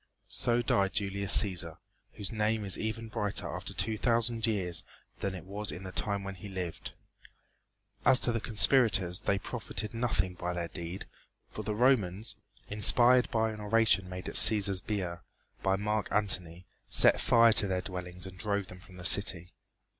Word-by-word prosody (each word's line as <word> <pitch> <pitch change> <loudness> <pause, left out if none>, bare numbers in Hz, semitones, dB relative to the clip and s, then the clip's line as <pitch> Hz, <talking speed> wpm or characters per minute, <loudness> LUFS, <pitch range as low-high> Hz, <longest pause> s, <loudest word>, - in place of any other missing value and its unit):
So 120 0 0
died 100 -4 0
Julius 100 -1 +4
Cæsar, 85 -5 -4 0.4
whose 100 - -5
name 110 -1 -2
is 95 - +6
even 110 +1 -5
brighter 105 -2 -2
after - - -6
two 110 -1 -3
thousand 115 -1 0
years 95 -6 0 0.4
than 100 -2 -4
it 90 - -10
was 100 +2 -4
in 90 - -9
the 95 - -8
time 100 +1 -3
when 95 0 -7
he 95 +2 -11
lived. 90 -3 -7 1.1
As 130 0 +5
to 120 - +1
the 115 - -2
conspirators 105 -6 +2
they 100 -1 -1
profited 105 +2 -6
nothing 110 -6 -2
by 90 0 -5
their 85 -1 -4
deed, 85 +2 -8 0.5
for - - -7
the 105 - -4
Romans, 110 -4 0 0.3
inspired 120 +4 +3
by 110 -1 -1
an 110 -1 -9
oration 105 -4 +1
made 90 0 -8
at - - -6
Cæsar's 100 -3 +7
bier 95 -5 -5 0.4
by 95 0 0
Marc 105 +1 -3
Antony, 90 -4 -1 0.2
set - - +4
fire 115 -1 +4
to 100 - +4
their 95 -1 -2
dwellings 90 -1 -8
and 95 -1 -12
drove 100 -2 -2
them 90 - -12
from 90 0 -16
the 90 - -10
city. 90 -2 +3
100 Hz, 170 wpm, -29 LUFS, 90-110 Hz, 1.1 s, Cæsar's